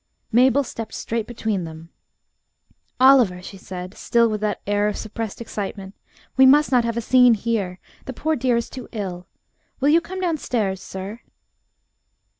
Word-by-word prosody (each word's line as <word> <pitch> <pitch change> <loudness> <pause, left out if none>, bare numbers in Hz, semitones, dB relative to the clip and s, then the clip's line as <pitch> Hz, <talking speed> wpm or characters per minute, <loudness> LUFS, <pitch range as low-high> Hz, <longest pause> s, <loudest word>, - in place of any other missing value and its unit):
Mabel 260 +4 +4
stepped 225 -3 -7
straight 225 -1 -3
between 220 -5 -2
them. 160 0 -9 1.1
"Oliver," 255 -9 +5
she 190 +2 -10
said, 185 0 -8
still 235 +1 +2
with 215 -1 -3
that 210 -1 -1
air 205 0 +1
of 210 - -2
suppressed 220 -1 -5
excitement, 200 -3 -6 0.4
"we 265 - +6
must 295 +2 +5
not 250 -2 +4
have 230 0 -2
a - - 0
scene 250 0 +5
here. 205 -4 -2 0.3
The 260 - -6
poor 315 +5 -1
dear 250 -2 +1
is 235 - -2
too 255 -2 -9
ill. 185 -5 -5 0.5
Will 280 +1 +2
you 330 +3 +5
come 375 +3 -7
downstairs, 245 - -1
sir?" 195 +4 -7
225 Hz, 160 wpm, -22 LUFS, 195-255 Hz, 1.1 s, we